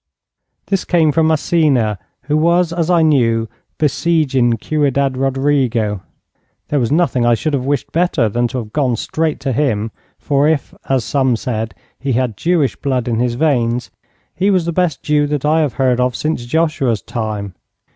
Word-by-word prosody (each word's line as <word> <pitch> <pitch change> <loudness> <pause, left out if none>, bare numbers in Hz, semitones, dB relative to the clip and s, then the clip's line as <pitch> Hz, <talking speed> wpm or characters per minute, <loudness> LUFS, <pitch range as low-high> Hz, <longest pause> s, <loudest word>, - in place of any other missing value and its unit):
This 195 -2 -1
came 165 -4 +2
from 160 +2 +2
Massena, 145 - +1 0.2
who 150 +3 -1
was, 170 +2 +2
as 170 -1 -1
I 170 -2 +4
knew, 115 -7 +2 0.3
besieging 140 -6 +1
Ciudad 140 -3 0
Rodrigo. 130 -6 0 0.7
There 145 - +1
was 120 0 0
nothing 155 -6 +2
I 120 0 +4
should 150 +7 -2
have 130 -2 -1
wished 145 -2 -1
better 170 -9 +1
than 120 +3 0
to 125 - -5
have 110 -3 -6
gone 130 -5 +1
straight 155 +7 -2
to 135 - -1
him, 115 -6 0 0.3
for 140 0 +1
if, 160 -3 -1 0.2
as 130 -4 +1
some 130 -3 +1
said, 110 -4 -4 0.2
he 135 -1 -1
had 120 -2 0
Jewish 165 - +1
blood 130 -4 -2
in 115 -2 0
his 120 -1 0
veins, 125 -4 0 0.4
he 195 +3 +1
was 185 -4 +2
the 170 - -2
best 180 -3 0
Jew 150 -1 +2
that 145 -1 -2
I 155 +2 +3
have 150 -5 0
heard 130 -2 +1
of 125 -1 +1
since 150 -6 -2
Joshua's 155 -6 0
time. 105 -4 -4
135 Hz, 175 wpm, -17 LUFS, 120-155 Hz, 0.7 s, I